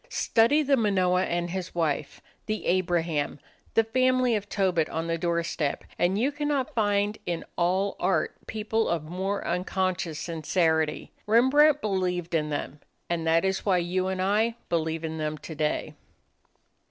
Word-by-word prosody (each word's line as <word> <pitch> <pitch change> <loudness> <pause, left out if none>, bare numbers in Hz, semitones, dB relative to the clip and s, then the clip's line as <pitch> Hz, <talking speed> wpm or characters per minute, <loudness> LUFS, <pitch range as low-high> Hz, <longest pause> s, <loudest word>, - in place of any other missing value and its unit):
Study 290 - +3
the 275 -1 +3
Manoah 185 -4 +2
and 175 0 -2
his 185 -1 -5
wife, 160 -4 -1 0.3
the 215 0 -3
Abraham, 170 -5 0 0.4
the 225 - +5
family 255 +1 +2
of 205 -1 -4
Tobit 185 -5 +1
on 165 +1 -3
the 165 0 0
doorstep, 170 -3 -1 0.2
and 180 +3 +2
you 255 +6 +1
cannot 290 -2 -1
find 205 -1 +1
in 170 -1 -2
all 185 +3 +1
art 185 +1 +1
people 220 +1 -1
of 170 -3 0
more 190 +5 -3
unconscious 180 -2 -1
sincerity. 160 -1 0 0.2
Rembrandt 280 +7 +5
believed 180 -4 -1
in 155 -2 +1
them. 145 0 -4 0.3
And 165 -1 -1
that 165 +2 +3
is 190 0 0
why 190 -3 +3
you 180 +2 0
and 190 0 -2
I 215 +4 +2
believe 160 -1 -1
in 160 0 -4
them 155 0 -2
today. 155 0 -3
185 Hz, 150 wpm, -27 LUFS, 165-215 Hz, 0.4 s, the